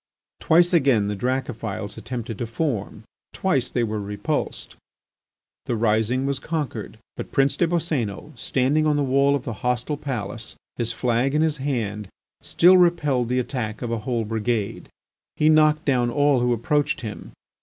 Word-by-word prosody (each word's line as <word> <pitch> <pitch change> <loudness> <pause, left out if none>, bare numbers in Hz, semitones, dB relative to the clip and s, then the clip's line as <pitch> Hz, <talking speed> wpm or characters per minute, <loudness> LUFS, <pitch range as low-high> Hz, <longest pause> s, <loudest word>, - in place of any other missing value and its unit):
Twice 175 +2 +4
again 130 -11 +3
the 105 - -2
Dracophils 115 -3 -3
attempted 120 -3 -6
to 120 - -2
form, 115 -5 -3 0.3
twice 135 -10 0
they 120 - 0
were 110 -2 -2
repulsed. 100 0 -3 0.9
The 120 - 0
rising 110 +3 +1
was 140 -1 -1
conquered. 140 -9 -4 0.2
But - - -6
Prince 135 0 +2
des 175 - +2
Boscénos, 155 - -2
standing 140 +4 +1
on 150 - +2
the 145 - +1
wall 140 +1 +3
of 140 - -3
the 115 - -4
hostile 125 +4 -1
palace, 115 -6 -5 0.2
his 115 -1 -1
flag 125 +4 0
in 155 - +3
his 155 -2 0
hand, 110 -7 -3 0.3
still 180 +2 +5
repelled 150 -9 +2
the 125 - +1
attack 120 -3 -3
of 120 - -3
a 115 - -1
whole 115 0 -2
brigade. 110 -1 -2 0.5
He 155 - +3
knocked 155 0 +4
down 125 -4 +2
all 145 +1 +3
who 125 0 +1
approached 140 +5 0
him. 110 -4 -7
125 Hz, 160 wpm, -23 LUFS, 115-145 Hz, 0.9 s, still